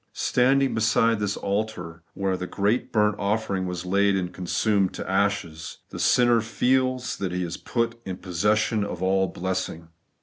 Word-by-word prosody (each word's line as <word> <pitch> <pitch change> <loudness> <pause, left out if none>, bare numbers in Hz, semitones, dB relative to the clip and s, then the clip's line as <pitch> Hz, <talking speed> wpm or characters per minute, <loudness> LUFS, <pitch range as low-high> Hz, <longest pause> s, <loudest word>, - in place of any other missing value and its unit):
Standing 135 +2 +2
beside 115 0 +2
this 105 -1 -1
altar 100 -5 -3
where 95 -1 0
the 90 0 -5
great 105 +7 0
burnt 105 -2 +2
offering 100 -2 -1
was 90 0 -4
laid 100 +2 +2
and 90 -2 -2
consumed 95 +2 0
to - - -6
ashes, 95 -5 -1
the - - -7
sinner 120 -2 +4
feels 130 +3 0
that 95 -2 -3
he 90 0 -2
is 85 -1 -4
put 115 -1 -2
in 95 -3 -5
possession 105 +4 +1
of 90 -3 -5
all 95 0 +2
blessing. 90 -2 -4
100 Hz, 160 wpm, -25 LUFS, 90-110 Hz, -, sinner